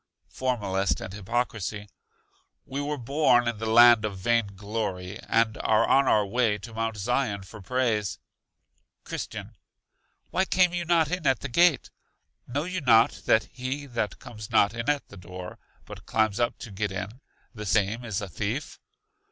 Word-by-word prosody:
Formalist 100 -7 -1
and 95 -1 -7
Hypocrisy. 105 -1 -3 0.8
We 140 +2 -4
were 145 +1 -2
born 125 -1 +3
in 115 -3 -2
the 110 - -3
land 120 0 +7
of 105 -3 -3
Vain 115 +3 +1
glory, 100 -2 -4
and 115 -1 +1
are 110 +1 +3
on 135 0 +4
our 105 -4 +4
way 110 0 +1
to 110 +3 -10
Mount 115 -1 -2
Zion 105 -1 -1
for 95 +2 -12
praise. 115 -3 0 0.9
Christian. - - -6 0.8
Why 190 - +1
came 180 -1 +3
you 175 -1 -2
not 165 -2 +2
in 180 -4 -1
at 130 - +2
the 140 - -4
Gate? 170 +4 +3 0.6
Know 140 +4 -2
you 185 +1 -3
not 115 -3 +5 0.2
that 110 - +5
he 130 +3 -4
that 115 -7 -3
comes 110 -3 -10
not 100 - +3
in 115 +4 -3
at 145 -3 0
the 100 - -12
door, 90 0 -9 0.3
but - - -11
climbs 110 -1 +1
up 120 0 0
to 115 - -9
get 100 +1 -2
in, 105 +7 -6 0.3
the 105 -3 -7
same 105 +5 +1
is 110 -5 -3
a 105 - -4
thief? 110 - -4
115 Hz, 170 wpm, -27 LUFS, 105-130 Hz, 0.9 s, land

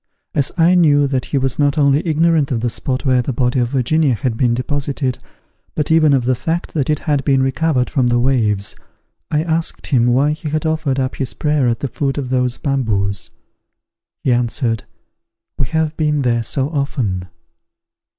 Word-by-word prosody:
As 140 - 0
I 170 +1 +4
knew 150 -5 +4
that 135 -2 -1
he 140 - -2
was 135 0 -1
not 145 0 +2
only 140 0 +3
ignorant 160 -2 +2
of 120 -4 -1
the 120 0 -1
spot 130 +3 -3
where 130 -2 +3
the 130 - -3
body 125 +1 0
of 120 -1 +1
Virginia 135 +1 +1
had 125 -1 -2
been 120 0 +1
deposited, 135 0 -2 0.6
but 150 0 -1
even 160 -2 +5
of 130 -3 +1
the 130 - +2
fact 160 +7 -3
that 145 -4 -1
it 150 - +2
had 145 -4 0
been 135 -1 +2
recovered 135 -1 +1
from 130 -5 +1
the 120 0 +2
waves, 110 -6 0 0.5
I 150 0 +1
asked 165 0 -1
him 120 -4 +2
why 135 +5 +3
he 155 +1 -4
had 155 +1 -2
offered 155 -4 0
up 130 0 -2
his 135 -4 -2
prayer 150 -4 +1
at 115 -1 -1
the 140 - -1
foot 135 +1 -2
of 130 -3 -3
those 125 -1 +1
bamboos. 100 -9 -1 0.9
He 125 - +2
answered, 120 -2 -1 0.7
"We 135 - 0
have 160 +4 -1
been 150 -2 +1
there 120 -2 +1
so 135 +4 0
often." 120 - -2
135 Hz, 190 wpm, -18 LUFS, 125-150 Hz, 0.9 s, even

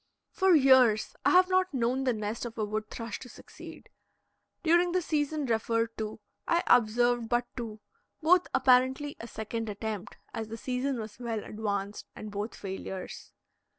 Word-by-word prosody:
For 380 -2 +4
years 260 -6 +5
I - - +4
have 365 0 +6
not 370 -4 +1
known 255 +2 0
the 255 - +3
nest 215 +1 -4
of 235 -1 -6
a 215 - 0
wood 215 +1 -3
thrush 230 -2 -6
to 250 - -11
succeed. - - -12 0.7
During 345 +1 +3
the 365 - +2
season 300 -1 -1
referred 230 -1 0
to 215 0 -4 0.3
I 340 +1 +2
observed 240 0 +3
but 240 0 +1
two, 220 -3 -6 0.4
both 355 +3 +4
apparently 265 +2 +3
a 230 - -7
second 225 0 -4
attempt, 210 -1 -5 0.2
as 220 -1 -4
the 225 +1 -7
season 255 +2 -2
was 220 +1 -8
well 230 -3 -3
advanced, 205 -1 -4
and 215 - -8
both 205 +2 -4
failures. 190 -1 -7
235 Hz, 160 wpm, -29 LUFS, 215-270 Hz, 0.7 s, have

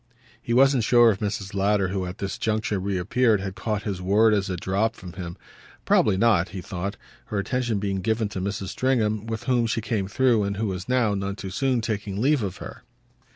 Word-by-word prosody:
He - - -6
wasn't 130 0 +4
sure 120 0 +6
if 100 - -4
Mrs. 100 -1 -3
Lowder, 100 -1 +1
who 95 -1 -2
at 90 +3 -7
this 95 -1 -4
juncture 110 -2 0
reappeared, 100 +4 +1
had 95 -1 -4
caught 105 0 -3
his 95 -3 -3
word 105 +4 +4
as 100 -1 0
it 90 -2 -3
dropped 100 +4 0
from 90 -4 -10
him; 85 -2 -7 0.5
probably 100 -3 +3
not, 100 -5 +3
he 95 - -6
thought, 95 +2 -5 0.3
her 105 - -4
attention 120 +2 -1
being 100 -1 -2
given 110 +2 0
to 95 - -5
Mrs. 100 -1 -3
Stringham, 110 -4 0
with 110 -1 -4
whom 120 -3 +2
she 115 - -1
came 110 -4 -2
through 120 +1 +2
and 100 -1 -2
who 110 - -1
was 95 0 -4
now, 125 -5 +2
none 100 0 -3
too 95 -2 -7
soon, 130 +3 +1
taking 105 -3 -3
leave 140 +3 +3
of 100 -4 -4
her. - - -9
105 Hz, 210 wpm, -25 LUFS, 95-115 Hz, 0.5 s, sure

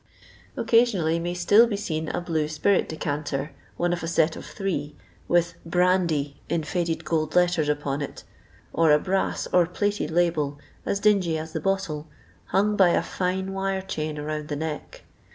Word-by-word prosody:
Occasionally 200 -9 +3
may 175 +1 -3
still 205 +7 +5
be 210 -3 -2
seen 160 -5 -3
a - - -2
blue 160 -3 -1
spirit 170 +6 +1
decanter, 145 -2 -3 0.3
one 175 0 +1
of 175 - -2
aset 165 -1 +2
of - - -9
three, 165 -8 -3 0.3
with 175 0 +2
"brandy," 170 -5 +1
in 165 - 0
fiuled 170 0 -2
gold 155 -1 -1
letters, 175 -4 +3
upon 145 -1 -1
it, 140 - -6 0.5
or 165 -2 +4
a 150 - +7
brass 190 +5 -1
or 175 -2 +5
plated 205 +3 -1
label, 160 -4 +1 0.3
as 200 - 0
dingy 195 -6 +3
as 160 +1 -6
the 160 - -2
bottle, 185 -5 -1 0.4
hung 210 +2 +1
by 190 -3 +5
a - - +2
fine 190 +1 -2
wire 195 0 -1
chain 155 -5 -4
round 150 0 -4
the 150 - -3
neck. 155 0 -5
170 Hz, 165 wpm, -25 LUFS, 155-190 Hz, 0.5 s, a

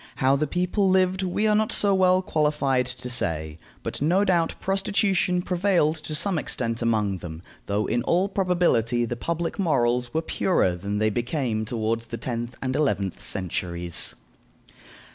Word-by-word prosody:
How 135 +1 +3
the 150 +2 0
people 180 +5 0
lived 185 0 +2
we 190 +3 -1
are 215 - +3
not 215 +1 +1
so 200 -1 +4
well 185 0 +3
qualified 150 -6 +1
to 125 0 -6
say, 80 -10 -2 0.2
but - - -5
no 180 +7 +3
doubt 170 -4 +1
prostitution 195 -2 0
prevailed 175 -4 +1
to 155 0 -5
some 185 +1 +2
extent 115 -4 -1
among 105 -5 0
them, 80 -1 -8 0.2
though 100 +1 0
in 120 - 0
all 175 +9 +1
probability 175 - +1
the 120 - -4
public 170 - -3
morals 125 -8 +1
were 160 +4 -1
purer 160 - +1
than 100 +4 -4
they 110 +1 +1
became 120 -1 -2
toward 115 0 -1
the 115 0 -7
tenth 120 0 -5
and 130 0 -2
eleventh 120 - -1
centuries. 85 -2 -1
135 Hz, 160 wpm, -25 LUFS, 115-180 Hz, 0.2 s, so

